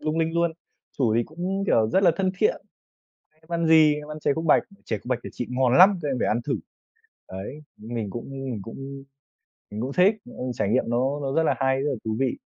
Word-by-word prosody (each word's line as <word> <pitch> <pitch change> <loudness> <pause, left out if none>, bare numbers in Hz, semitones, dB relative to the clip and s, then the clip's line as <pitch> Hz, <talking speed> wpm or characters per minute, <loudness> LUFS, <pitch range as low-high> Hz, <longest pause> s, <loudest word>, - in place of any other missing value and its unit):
lung 155 +1 -1
linh 165 0 +1
luôn. 170 0 +2 0.5
Chủ 115 -5 +2
thì 120 - +3
cũng, 180 +8 -3
kiểu, 110 - +3
rất 190 - +2
là 180 - +6
thân 190 -1 +1
thiện: 470 - +3 0.8
"Em 160 - -25
ăn 170 -1 0
gì?" 160 -2 +6
"Em 150 0 -7
ăn 150 - -6
chè 145 - +2
khúc 160 - -3
bạch." 160 - +5 0.2
"Chè 110 - -2
khúc - - -21
bạch 125 -1 0
của - - -6
chị 120 - -4
ngon 125 0 +2
lắm, 190 +1 +7
các 150 - -2
em 135 - 0
phải - - +1
ăn 115 - +1
thử", - - 0 0.8
đấy. 100 +11 -7 0.2
Mình 110 -1 -5
cũng 120 +5 -7
mình 135 -4 -5
cũng 135 +5 -8 0.7
mình 105 - -5
cũng 130 +4 -3
thích, 185 +7 +4 0.2
ông 125 - -4
trải 100 - -1
nghiệm 125 +5 +2
nó 130 +4 0
nó 135 -1 -2
rất 165 - +2
là 160 - +2
hay, 135 -1 +2
rất 145 - 0
là 135 - -1
thú 110 0 -2
vị. 130 -1 0
135 Hz, 245 wpm, -25 LUFS, 120-160 Hz, 0.8 s, lắm